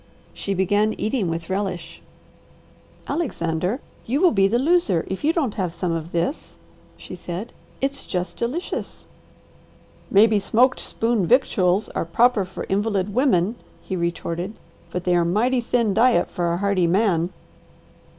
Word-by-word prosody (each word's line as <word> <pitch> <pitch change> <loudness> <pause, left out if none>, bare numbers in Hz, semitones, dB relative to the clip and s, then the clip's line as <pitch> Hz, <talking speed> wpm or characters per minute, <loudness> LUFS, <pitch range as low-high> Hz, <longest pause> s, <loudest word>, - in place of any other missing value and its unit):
She 200 - -3
began 205 +3 +2
eating 215 -2 -1
with 165 0 -4
relish. 185 -4 -3 1.1
"Alexander, 190 - -1 0.3
you 260 +5 +1
will 360 0 +5
be 195 -2 +4
the 225 +4 +1
loser 265 - +2
if 190 - -5
you 305 - +4
don't 290 -10 0
have 175 -2 -2
some 175 0 -2
of 165 0 -3
this," 170 - -2 0.4
she - - -10
said. 180 +5 -6 0.3
"It's 275 +1 -2
just 180 0 -3
delicious!" 265 +10 -4 1.0
"Maybe 210 +1 +5
smoked 245 +6 +3
spoon 225 -5 0
victuals 205 -6 +3
are - - -2
proper 210 +5 +3
for 185 - -7
invalid 205 0 0
women," 220 -4 +2 0.2
he 190 - -5
retorted, 170 +3 -3 0.3
"but 180 +1 -4
they 180 -1 +2
are 175 - +3
mighty 235 +9 +1
thin 235 -3 +1
diet 225 -3 +3
for 170 -1 -1
a 170 - 0
hardy 195 -2 +1
man." 180 -2 +2
200 Hz, 145 wpm, -23 LUFS, 175-235 Hz, 1.1 s, will